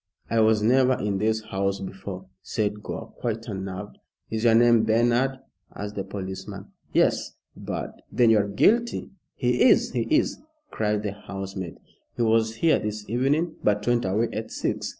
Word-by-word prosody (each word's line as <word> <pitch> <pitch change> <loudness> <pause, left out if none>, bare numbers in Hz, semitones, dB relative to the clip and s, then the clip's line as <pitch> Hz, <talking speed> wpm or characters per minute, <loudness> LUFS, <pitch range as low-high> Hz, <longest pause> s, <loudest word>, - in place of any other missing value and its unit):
"I 115 - +3
was 110 -1 +4
never 130 +3 +4
in 100 -2 -1
this 110 +1 +1
house 100 -2 -1
before," 95 -1 -7 0.2
said 105 -1 -2
Gore, - - -7
quite 115 -1 -3
unnerved. 95 -1 -6 0.3
"Is 110 +1 -1
your 115 -1 +6
name 120 -1 +5
Bernard?" 120 +4 +2 0.4
asked 105 0 -5
the 100 - -3
policeman. 95 0 -7 0.2
"Yes! - - +1 0.2
but - - -6
" - - -37
"Then 120 -2 +4
you 110 - +5
are 100 - 0
guilty." 230 - +2 0.2
"He 125 -1 0
is - - +5
he 120 -3 -1
is!" - - +2 0.3
cried 105 -1 0
the 105 - -2
housemaid. 95 -3 -7 0.4
"He 120 - 0
was 110 0 +2
here 160 +6 +3
this 105 0 -5
evening, 140 +8 0
but 105 0 +1
went 120 -1 +2
away 105 +5 +1
at 110 +1 -4
six. - - -2
110 Hz, 170 wpm, -25 LUFS, 100-120 Hz, 0.4 s, your